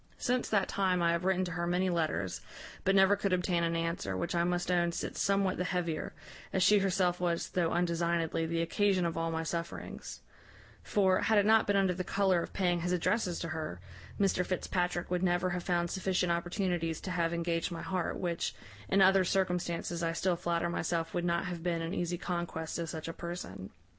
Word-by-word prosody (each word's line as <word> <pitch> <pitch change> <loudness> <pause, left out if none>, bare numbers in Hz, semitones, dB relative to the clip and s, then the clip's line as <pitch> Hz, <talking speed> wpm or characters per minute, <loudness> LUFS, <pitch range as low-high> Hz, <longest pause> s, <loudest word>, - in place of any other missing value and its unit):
Since 250 0 0
that 200 -3 +2
time, 185 -2 +1
I 170 - +4
have 170 +1 -1
written 185 -1 +2
to 180 - -5
her 170 0 -2
many 180 +2 +1
letters, 155 - -1 0.4
but 195 - +3
never 195 +1 +6
could 200 -1 -1
obtain 180 -1 +1
an 165 0 0
answer, 165 - -2
which - - -2
I 170 0 +2
must 175 0 0
own 175 -1 +2
sits - - -3
somewhat 195 -1 +2
the 180 - 0
heavier, 175 -3 -2 0.4
as 190 - +2
she 210 +1 +6
herself 185 -2 +1
was, 170 -1 -1
though 175 -3 +1
undesignedly, 170 -1 0
the 165 0 0
occasion 190 +1 +2
of 165 - -1
all 165 0 -1
my 165 0 -2
sufferings: 170 +1 -5 0.6
for, 190 -2 +2
had 220 - +3
it 205 - +4
not 220 0 +5
been 205 - +2
under 195 -2 +3
the 185 +1 -3
colour 190 -2 +2
of - - -6
paying 175 -3 +1
his 180 +1 -1
addresses 180 0 0
to 165 - -3
her, 155 - -4 0.4
Mr 195 -2 +2
Fitzpatrick 180 -1 -1
would 180 -1 +1
never 180 0 +1
have 175 0 -2
found 175 -1 0
sufficient 185 -2 0
opportunities 170 -2 -1
to 185 - -5
have 170 -2 0
engaged 170 0 -1
my 170 - -5
heart, 185 -3 -2
which, 170 -2 -2 0.3
in 195 0 +5
other 190 0 +6
circumstances, 180 -2 -1
I 165 -1 0
still 180 +1 +1
flatter 170 -1 -1
myself 165 -1 -2
would 175 -1 -1
not 170 +1 +1
have 175 -2 -4
been 170 -1 -1
an 165 +2 -3
easy 175 -2 -1
conquest 170 -2 -3
to 170 -1 -3
such 160 0 -5
a 165 - -4
person. 170 - -6
175 Hz, 205 wpm, -31 LUFS, 170-185 Hz, 0.6 s, never